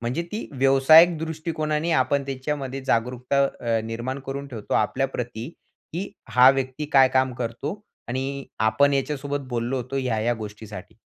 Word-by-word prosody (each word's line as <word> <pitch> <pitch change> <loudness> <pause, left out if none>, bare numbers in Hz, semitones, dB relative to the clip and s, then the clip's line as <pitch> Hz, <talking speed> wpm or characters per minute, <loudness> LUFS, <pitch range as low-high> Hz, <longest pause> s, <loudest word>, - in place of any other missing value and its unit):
म्हणजे 120 +8 -2
ती 215 - -4
व्यावसायिक 155 +6 +6
दृष्टिकोनाने 160 0 -2
आपण 140 +2 0
त्याच्यामध्ये 135 0 -4
जागरूकता 125 +2 +1 0.2
अ, 115 -2 0
निर्माण 120 +4 -4
करून 140 +1 -4
ठेवतो 115 -5 -5
आपल्याप्रती, 125 +1 -1 0.4
की 185 +5 -4 0.2
हा 125 +2 +7
व्यक्ती 135 +2 -2
काय 135 -1 +7
काम 130 0 +1
करतो 125 - -4 0.3
आणि 135 +2 -3 0.2
आपण 110 +6 +3
याच्यासोबत 140 0 -2
बोललो 120 +2 -2
होतो 130 +2 -4
ह्या-ह्या 120 -2 0
गोष्टीसाठी. 105 0 -9
130 Hz, 135 wpm, -24 LUFS, 120-140 Hz, 0.4 s, हा